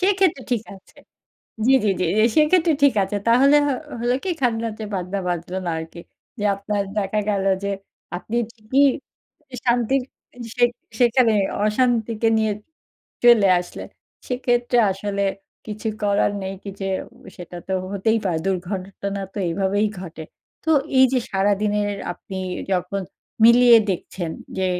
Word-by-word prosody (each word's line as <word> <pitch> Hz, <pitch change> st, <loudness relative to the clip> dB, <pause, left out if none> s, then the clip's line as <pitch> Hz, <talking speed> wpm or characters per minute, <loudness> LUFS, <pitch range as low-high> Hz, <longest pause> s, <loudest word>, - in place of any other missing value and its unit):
সেক্ষেত্রে 375 Hz, -7 st, +2 dB
ঠিক 230 Hz, -3 st, 0 dB
আছে। 190 Hz, -, -19 dB, 0.7 s
জি, 265 Hz, -, +5 dB
জি, 210 Hz, -, +3 dB
জি, -, -, +2 dB
জি, -, -, +5 dB
সেক্ষেত্রে 325 Hz, +2 st, +4 dB
ঠিক 280 Hz, -3 st, +5 dB
আছে 195 Hz, +2 st, -2 dB
তাহলে 270 Hz, +5 st, +6 dB
হ -, -, +1 dB, 0.3 s
হলো 240 Hz, +1 st, +1 dB
কি 380 Hz, -, -1 dB
খাজনার 230 Hz, -3 st, 0 dB
চেয়ে 215 Hz, -2 st, -6 dB
বাজনা 185 Hz, +1 st, -3 dB
বাজল 175 Hz, 0 st, -3 dB
না -, -, 0 dB
আরকি। 160 Hz, +1 st, -8 dB, 0.4 s
যে 205 Hz, -, -3 dB
আপনার 200 Hz, +1 st, -2 dB, 0.2 s
দেখা 205 Hz, +1 st, 0 dB
গেল 200 Hz, -2 st, 0 dB, 0.2 s
যে 200 Hz, -, -1 dB, 0.5 s
আপনি 220 Hz, +6 st, -5 dB, 0.2 s
ঠিকই 240 Hz, +5 st, +2 dB, 0.8 s
শান্তির 245 Hz, +2 st, +2 dB, 0.5 s
সে 245 Hz, -, +5 dB, 0.3 s
সেখানে 240 Hz, -1 st, +4 dB, 0.3 s
অশান্তিকে 225 Hz, 0 st, +1 dB
নিয়ে 220 Hz, -1 st, +1 dB, 0.7 s
চলে 225 Hz, -5 st, +7 dB
আসলে 175 Hz, -, -8 dB, 0.4 s
সেক্ষেত্রে 245 Hz, -1 st, +1 dB
আসলে 200 Hz, +1 st, -3 dB, 0.4 s
কিছু 215 Hz, +1 st, -4 dB
করার 205 Hz, 0 st, +2 dB
নেই 190 Hz, 0 st, -4 dB
কি 200 Hz, -, -6 dB
যে 195 Hz, -, -2 dB, 0.5 s
সেটা 175 Hz, 0 st, -9 dB
তো -, -, -2 dB, 0.2 s
হতেই 220 Hz, +3 st, +1 dB
পারে। 175 Hz, -4 st, 0 dB
দুর্ঘটনা 195 Hz, +1 st, -3 dB
তো -, -, -5 dB
এইভাবেই 195 Hz, +4 st, +1 dB
ঘটে। 160 Hz, -3 st, -8 dB, 0.4 s
তো 320 Hz, -, 0 dB, 0.3 s
এই 260 Hz, -, +8 dB
যে 260 Hz, -, +3 dB
সারাদিনের 205 Hz, +1 st, +1 dB, 0.2 s
আপনি 190 Hz, +2 st, -8 dB, 0.3 s
যখন 185 Hz, +2 st, -1 dB, 0.4 s
মিলিয়ে 235 Hz, 0 st, +8 dB
দেখছেন 175 Hz, -1 st, -4 dB, 0.3 s
যে 190 Hz, -, +1 dB
210 Hz, 140 wpm, -22 LUFS, 195-240 Hz, 0.8 s, এই